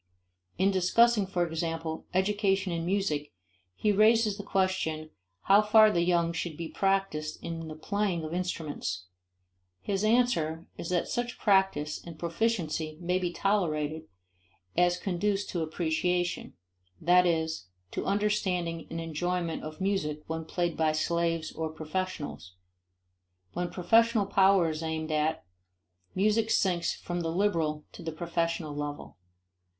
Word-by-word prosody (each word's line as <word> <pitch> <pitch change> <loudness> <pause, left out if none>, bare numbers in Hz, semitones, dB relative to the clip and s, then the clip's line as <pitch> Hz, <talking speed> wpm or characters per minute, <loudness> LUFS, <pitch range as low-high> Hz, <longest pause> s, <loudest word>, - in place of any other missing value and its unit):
In 190 +3 +3
discussing, 205 +3 +4
for 180 -2 0
example, 165 -1 -3
education 195 0 +1
in 165 0 -2
music 175 -7 0 0.4
he 210 - +1
raises 215 +1 +4
the 205 - -6
question 185 -6 -1 0.3
how 200 +2 +6
far 215 0 +6
the 170 - +1
young 170 -1 +2
should 165 -2 -4
be 170 - -4
practiced 195 -6 0
in 165 -1 -5
the 155 - -7
playing 195 0 -1
of 155 +1 -5
instruments. 155 - -3 0.7
His 195 - -2
answer 195 -9 +2
is 165 - -6
that 180 -1 +1
such 240 0 -2
practice 190 -7 +2
and 170 -2 -9
proficiency 170 -3 -1
may 180 +1 0
be 180 -2 -1
tolerated 160 -6 0 0.7
as 175 0 +3
conduce 195 +2 -1
to 175 - -2
appreciation; 175 +2 -1 0.4
that 180 +1 +5
is, 160 - -1 0.2
to - - -3
understanding 190 -5 0
and 165 - -4
enjoyment 165 +1 -2
of 155 0 -8
music 170 -6 -1
when 160 0 -4
played 175 0 -1
by 155 -1 +2
slaves 165 +1 0
or 160 -1 -3
professionals. 155 - -5 1.0
When 175 0 -2
professional 225 +3 +3
power 195 -3 +4
is 155 0 -5
aimed 160 -1 -3
at, 155 +1 0 0.7
music 215 +3 +2
sinks 175 -5 +1
from 175 0 -4
the 165 - -2
liberal 165 -5 0
to - - -11
the 165 - -4
professional 165 -1 -2
level. 145 -6 -5
175 Hz, 135 wpm, -29 LUFS, 160-195 Hz, 1.0 s, how